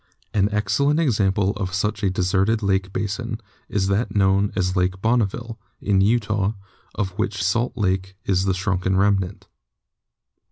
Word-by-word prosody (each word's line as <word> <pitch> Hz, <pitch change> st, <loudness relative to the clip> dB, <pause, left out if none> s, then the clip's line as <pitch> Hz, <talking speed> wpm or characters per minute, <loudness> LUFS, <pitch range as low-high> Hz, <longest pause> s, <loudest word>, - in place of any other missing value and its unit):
An 100 Hz, -1 st, +2 dB
excellent 140 Hz, +9 st, +1 dB
example 100 Hz, -, +2 dB
of 95 Hz, -3 st, -3 dB
such 105 Hz, +1 st, -1 dB
a 100 Hz, -, +2 dB
deserted 95 Hz, +4 st, +1 dB
lake 95 Hz, -1 st, +1 dB
basin 105 Hz, +4 st, -3 dB, 0.3 s
is 100 Hz, -2 st, 0 dB
that 105 Hz, +3 st, 0 dB
known 100 Hz, 0 st, +3 dB
as 90 Hz, -1 st, 0 dB
Lake 90 Hz, 0 st, 0 dB
Bonneville, 115 Hz, +1 st, 0 dB, 0.2 s
in 100 Hz, -2 st, +2 dB
Utah, 105 Hz, -1 st, +1 dB, 0.4 s
of 95 Hz, -2 st, -1 dB
which 100 Hz, -3 st, -1 dB
Salt 115 Hz, +7 st, 0 dB
Lake 95 Hz, -2 st, -1 dB
is 95 Hz, -1 st, +1 dB
the 95 Hz, -1 st, +1 dB
shrunken 95 Hz, -1 st, 0 dB
remnant. 100 Hz, -1 st, +1 dB
100 Hz, 145 wpm, -22 LUFS, 95-110 Hz, 0.4 s, known